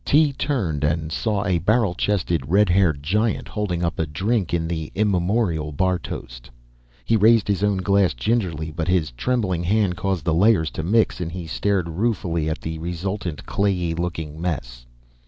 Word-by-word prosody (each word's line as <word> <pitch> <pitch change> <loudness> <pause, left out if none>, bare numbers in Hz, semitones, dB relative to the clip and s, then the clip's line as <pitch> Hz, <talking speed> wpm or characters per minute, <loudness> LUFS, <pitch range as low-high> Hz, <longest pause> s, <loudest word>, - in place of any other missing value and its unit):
Tee 150 -1 +3
turned 100 - -1
and 80 +1 0
saw 105 +2 -1
a 90 -4 +1
barrel 105 +2 +2
chested 85 -7 -1
red 100 +2 +4
haired 85 -6 +2
giant 105 +8 0
holding 90 -5 -2
up 85 - -3
a 80 - 0
drink 95 +6 -1
in 85 -1 0
the 80 -2 -4
immemorial 95 -5 +1
bar 90 +4 +1
toast. - - -8 0.6
He 115 - +2
raised 110 0 +5
his 100 -1 0
own 105 -1 +2
glass 100 -3 +2
gingerly, 80 - -1
but 80 +1 -3
his 90 -5 +1
trembling 95 - -1
hand 100 0 +1
caused 95 -6 -2
the 85 - +2
layers 90 -2 +3
to - - -4
mix 105 +3 +1
and 85 -1 -3
he 90 -1 -6
stared 95 +2 0
ruefully 85 -4 -1
at 80 - -3
the 80 0 -5
resultant 85 0 -4
clayey 90 -4 0
looking 80 -2 -4
mess. - - -4
90 Hz, 175 wpm, -22 LUFS, 80-105 Hz, 0.6 s, raised